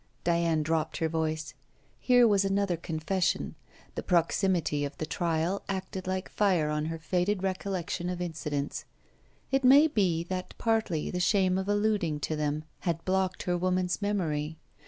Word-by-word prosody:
Diana 170 -2 +2
dropped 160 0 -1
her 160 - +1
voice. 160 -1 -2 0.5
Here 245 -2 +5
was 200 -2 +3
another 195 -2 +1
confession. 170 +3 -1 0.4
The - - -3
proximity 170 -3 +1
of 140 0 -5
the 155 - -3
trial 170 +3 -1
acted 190 -1 -4
like 185 0 -2
fire 180 -7 +1
on 150 0 -1
her 165 +1 -3
faded 180 +4 0
recollection 185 -2 -2
of 180 -1 -3
incidents. 150 -4 -3 0.7
It 270 0 +2
may 275 +4 +8
be 185 - +1
that 185 +1 -5
partly 220 -9 0
the 180 - -2
shame 185 0 +3
of 190 +1 -3
alluding 205 -7 +1
to 155 - -1
them 150 0 -1 0.2
had 165 -2 -2
blocked 185 0 0
her 180 - 0
woman's 185 +1 0
memory. 160 -7 -1
180 Hz, 155 wpm, -29 LUFS, 160-195 Hz, 0.7 s, may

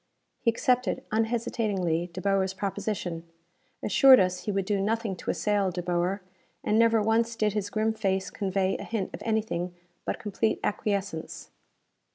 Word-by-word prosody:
He - - +2
accepted, 250 +2 +1
unhesitatingly, 215 -6 0
De 185 - -6
Boer's 195 -1 +1
proposition: 190 -4 -3 0.6
assured 265 +4 +7
us 185 -1 0
he 210 - 0
would 195 -1 -1
do 200 0 0
nothing 220 0 -1
to - - -6
assail 205 -2 +1
De 180 0 -4
Boer; 180 +3 0 0.4
and 215 - +2
never 230 -1 +4
once 230 +2 +2
did 215 -2 +1
his 205 -1 -2
grim 220 +1 0
face 195 -3 -1
convey 195 -1 0
a - - -5
hint 215 -5 -3
of - - -7
anything 210 -6 -1 0.3
but - - -2
complete 220 +1 -1
acquiescence. 200 -5 -2
200 Hz, 155 wpm, -28 LUFS, 185-220 Hz, 0.6 s, assured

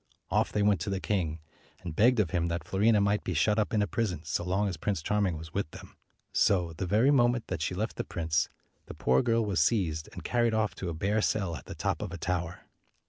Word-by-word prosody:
Off - - +2
they 105 - +1
went 100 -3 +3
to 95 - -2
the 95 -1 -1
king, 85 -2 -1 0.5
and 85 -4 -5
begged 120 +5 +4
of 100 -6 +1
him 85 -2 +1
that 85 -1 -2
Fiorina 105 +5 +3
might 100 +1 +1
be 90 - -3
shut 105 +8 +3
up 105 - 0
in 105 -2 +2
a - - +2
prison 100 -7 -2
so - - -2
long 95 +3 0
as 95 - -2
Prince 85 +1 -2
Charming 100 -4 +1
was 80 +1 -10
with 100 -5 -2
them. - - -12 0.4
So, 90 -4 +2
the 85 +4 -4
very 110 +9 +4
moment 120 -3 +3
that 90 -4 -3
she 90 - -1
left 110 +4 -3
the - - -1
prince, 80 -3 -1 0.4
the - - -8
poor 65 +1 +3
girl 115 -1 +1
was 95 -6 +1
seized 80 -5 +1
and - - -9
carried 120 -2 +1
off 110 -1 +1
to 90 - -4
a 85 - -4
bare 100 +6 +1
cell 95 -6 0
at - - -10
the - - -7
top - - -1
of - - -4
a 90 - -5
tower. 90 0 -3
95 Hz, 250 wpm, -29 LUFS, 85-105 Hz, 0.5 s, begged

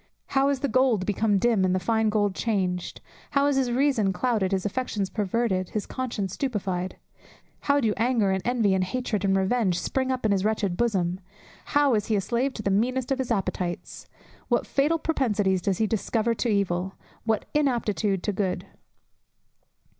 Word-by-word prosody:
"How 275 0 +3
is 275 -2 -1
the 280 - +1
gold 245 -5 +2
become 205 +1 +1
dim, 220 -1 +2
and 185 0 +2
the - - +1
fine 220 +3 +1
gold 205 -2 +1
changed?" 185 -5 -2 0.3
How 280 -1 +2
is 285 -1 +2
his 260 -2 +1
reason 245 -6 +2
clouded, 205 -1 0
his 190 -1 -1
affections 205 -3 -2
perverted; 205 -3 0
his 215 - -3
conscience 230 -7 -3
stupified! 190 -9 -2 0.6
How 285 0 +2
do 225 -6 +1
anger, 225 -4 +2
and 190 0 0
envy, 235 -5 +2
and 190 -1 +2
hatred, 210 0 -2
and 195 -1 +2
revenge, 190 -2 +1
spring 260 +7 -1
up 255 -3 -2
in 215 - +3
his 195 -1 +1
wretched 210 -4 0
bosom! 185 -5 0 0.5
How 285 -2 +3
is 210 -2 0
he 220 - +1
a 200 - +1
slave 245 +6 -1
to 215 - -5
the 200 - +1
meanest 250 +6 0
of 270 - +1
his 260 - -2
appetites! 185 -5 -3 0.4
What - - +1
fatal 295 +4 +1
propensities 210 - 0
does 190 0 0
he 220 - +2
discover 220 +2 0
to 235 +1 -1
evil! 190 -2 0 0.3
What 220 -2 0
inaptitude 225 - 0
to 210 - 0
good! 190 -1 -2
215 Hz, 180 wpm, -26 LUFS, 190-250 Hz, 0.6 s, How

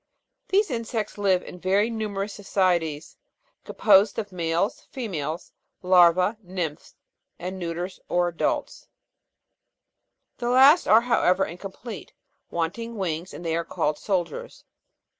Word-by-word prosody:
These 400 -3 +2
insects 225 -3 -3
live 190 -3 +2
in 180 - -10
very 195 +5 +2
numerous 210 -2 -3
societies, 175 -7 -1 0.5
composed 200 -1 +4
of 210 -2 -4
males, 170 +2 -1
females, 170 - -4 0.3
larvae, 180 +3 +5
nymphs, 180 -5 -5 0.4
and 185 +2 -6
neuters 175 +2 -4
or 175 0 +2
adults; 170 - -2 1.5
the 240 -1 -1
last 270 +7 +6
are 220 +2 +7
however 195 -6 +2
incomplete, 195 +5 -9 0.4
wanting 200 +8 -3
wings; 175 -2 -3
they 165 -2 -3
are 170 - -1
called 150 -2 -2
soldiers. 200 - -3
190 Hz, 110 wpm, -25 LUFS, 175-220 Hz, 1.5 s, are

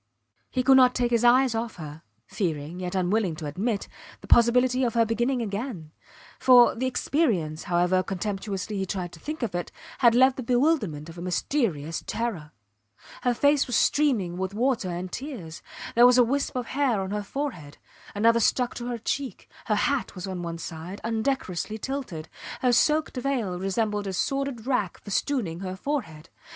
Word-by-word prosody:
He 255 - -1
could 265 0 +6
not 250 -1 +5
take 245 -1 +1
his 235 -1 +2
eyes 250 +1 +5
off 225 0 -3
her, 155 -2 -9 0.2
fearing, 165 -2 -3
yet 180 +1 -4
unwilling 185 -1 +1
to 155 -1 -7
admit, 200 +8 -2 0.3
the - - -12
possibility 250 +2 +4
of 235 -2 0
her 230 -1 +4
beginning 240 +3 0
again; 200 - -5 0.5
for, 250 -2 +7
the 255 +3 -2
experience, 210 - 0
however 180 +1 +2
contemptuously 195 +1 -4
he 190 - -1
tried 180 -2 -3
to 170 - -13
think 305 - -5
of 230 - -2
it, 175 0 -3 0.3
had 235 -2 +5
left 260 +1 +5
the - - -3
bewilderment 245 - +1
of 170 +1 -10
a - - -7
mysterious 175 - -1
terror. 200 -11 -3 0.7
Her 245 -1 +1
face 285 +2 +3
was 245 - -1
streaming 225 -15 +2
with 190 +2 -3
water 240 -4 0
and 180 +1 -4
tears; 235 - -7 0.3
there 240 +1 +7
was 250 0 +5
a 250 - +7
wisp 275 +4 -1
of 250 -1 -2
hair 255 -6 0
on 190 0 -4
her 210 0 -1
forehead, 205 - -5 0.4
another 230 +3 +4
stuck 245 +2 +1
to 240 - -5
her 240 -1 -2
cheek; 265 +4 -4 0.2
her 210 - +1
hat 265 +3 0
was 180 - -5
on 185 -2 -5
one 170 -1 -4
side, 165 +4 -7
undecorously 220 -3 -2
tilted; 235 - -5 0.3
her 250 -1 +3
soaked 300 +2 +2
veil 245 -9 -1
resembled 205 +1 -1
a 190 - -3
sordid 275 +2 -2
rag 250 -9 0
festooning 205 - -1
her 185 -1 -5
forehead. 190 - -4
225 Hz, 175 wpm, -26 LUFS, 180-255 Hz, 0.7 s, for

